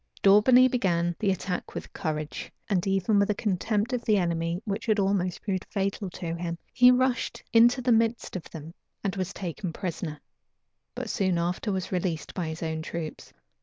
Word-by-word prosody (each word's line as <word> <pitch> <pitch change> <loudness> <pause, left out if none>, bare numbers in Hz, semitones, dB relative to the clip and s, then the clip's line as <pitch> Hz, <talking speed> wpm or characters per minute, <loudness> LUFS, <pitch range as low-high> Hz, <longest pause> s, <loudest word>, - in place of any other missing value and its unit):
Daubeney 230 +6 +7
began 175 -9 +1
the 205 - +1
attack 185 -1 -3
with - - -7
courage, 155 -4 -4 0.2
and 190 -2 0
even 195 +2 +2
with 200 - +2
a 210 - +2
contempt 210 +3 0
of 245 - -1
the 215 -2 +3
enemy 170 -1 0
which 210 +2 -3
had 215 -1 +3
almost 195 -3 0
proved 190 -3 -1
fatal 195 0 -2
to 170 -2 -5
him. 170 0 -4 0.2
He 250 -1 +7
rushed 250 -1 +1
into 240 +3 +5
the 250 - +2
midst 230 -1 +1
of 180 - -6
them, 160 0 -9 0.3
and 195 -1 -1
was 190 -1 -2
taken 180 -1 -5
prisoner; 165 -3 -4 0.8
but - - -4
soon 185 -3 +1
after 175 +5 -1
was 190 -2 -3
released 180 -3 -2
by 175 -4 -3
his 160 +1 -5
own 160 -1 -2
troops. 160 -1 -6
190 Hz, 180 wpm, -27 LUFS, 170-215 Hz, 0.8 s, Daubeney